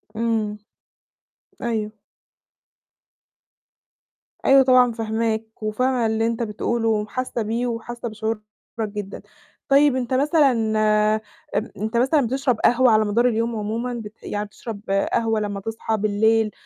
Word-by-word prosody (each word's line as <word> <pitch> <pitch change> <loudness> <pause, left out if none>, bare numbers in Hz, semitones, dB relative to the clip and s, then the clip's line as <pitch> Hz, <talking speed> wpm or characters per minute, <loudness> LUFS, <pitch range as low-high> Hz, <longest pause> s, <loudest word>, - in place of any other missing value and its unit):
امم. 220 -2 -1 1.1
أيوه 220 -2 -3 2.5
أيوه 270 0 +7
طبعًا 255 -1 +5
فاهماك، 220 -1 -3
وفاهمة 245 +3 0
اللي 220 0 +1
أنت 230 0 -1
بتقوله 225 +1 -1
وحاسة 225 +3 -2
بيه 230 +3 -1
وحاسة 235 +1 -5
بشعورك 220 0 -3 0.4
جدًا. 205 -2 -5 0.5
طيب 280 0 +5
أنت 255 -1 -2
مثلًا 285 +1 +4 1.3
أنت 220 +3 -2
مثلًا 265 +3 +3
بتشرب 255 -2 0
قهوة 245 0 +4
على 215 0 +4
مدار 230 +4 +2
اليوم 230 0 0
عمومًا 225 +4 -3
بت 220 -2 -9
يعني 205 0 -3
بتشرب 210 +1 -8 0.3
قهوة 225 -1 +1
لما 205 -1 -3
تصحى 225 +1 -3
بالليل، 215 +1 +2
225 Hz, 115 wpm, -22 LUFS, 215-245 Hz, 2.5 s, أيوه